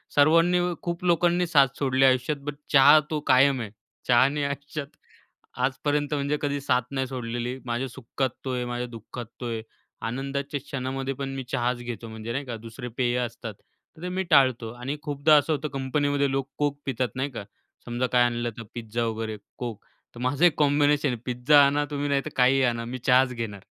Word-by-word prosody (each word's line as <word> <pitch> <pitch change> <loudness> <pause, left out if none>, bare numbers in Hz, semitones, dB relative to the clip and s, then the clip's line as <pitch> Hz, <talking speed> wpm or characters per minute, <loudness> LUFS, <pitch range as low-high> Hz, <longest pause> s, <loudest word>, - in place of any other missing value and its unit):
सर्वांनी 165 +4 +5 0.2
खूप 170 0 -3
लोकांनी 175 +1 +3
साथ 140 -5 +5
सोडली 135 -1 +3
आयुष्यात 130 +3 +2
बट 145 0 -4 0.2
चहा 145 +2 +8
तो 155 - 0
कायम 130 0 +5
आहे. 105 -3 -6 0.4
चहानी 135 +4 +4
आयुष्यात 140 +1 -4 0.8
आजपर्यंत 145 +2 -1
म्हणजे 145 +1 0
कधी 145 -1 -1
साथ 125 -2 +2
नाही 130 -1 -1
सोडलेली. 120 0 -4
माझ्या 120 +2 -2
सुखात 125 +2 -3 0.2
तो 130 - -2
आहे 125 -1 -2
माझ्या 120 0 -3
दुःखात 120 +1 -8 0.2
तो - - -3
आहे. 115 -1 -3 0.5
आनंदाच्या 140 +4 -3
क्षणामध्ये 135 0 -4
पण 135 +1 -5
मी 135 - -4
चहाच 125 -1 0
घेतो 120 -2 -6
म्हणजे 110 +1 -6
नाही 140 +3 -3
का 120 -2 -5
दुसरे 115 +2 -7
पेय 125 -1 +1
असतात. 115 -1 -7 0.4
तर - - -14
ते 180 - -2
मी 190 +1 -1
टाळतो 125 -4 +4
आणि 125 +4 -5
खूपदा 145 +1 +3
असं 150 +2 +2
होतं 150 +1 -2
कंपनीमध्ये 140 +1 0
लोक 135 0 -1 0.2
Coke 145 -1 0
पितात 130 -2 -1
नाही 135 +2 -1
का. 115 - -6 0.4
समजा 120 +1 -1
काय 125 - +6
आणलं 120 0 0
तर 115 - -6
पिझ्झा 115 0 -3
वगैरे, 110 -1 -3 0.3
Coke. 115 -4 -4 0.4
तर 120 - -9
माझं 140 +6 +2
एक 170 - +4
कॉम्बिनेशन 145 0 +3
आहे 125 - -2
पिझ्झा 135 +4 +5
आणा 145 +1 +1
तुम्ही 145 0 -2
नाही 140 -1 +2
तर - - -3
काहीही 130 +1 +4
आणा 115 -2 0
मी 125 +2 -5
चहाच 125 0 +5
घेणार. 110 -4 -5
135 Hz, 190 wpm, -26 LUFS, 120-145 Hz, 0.8 s, चहा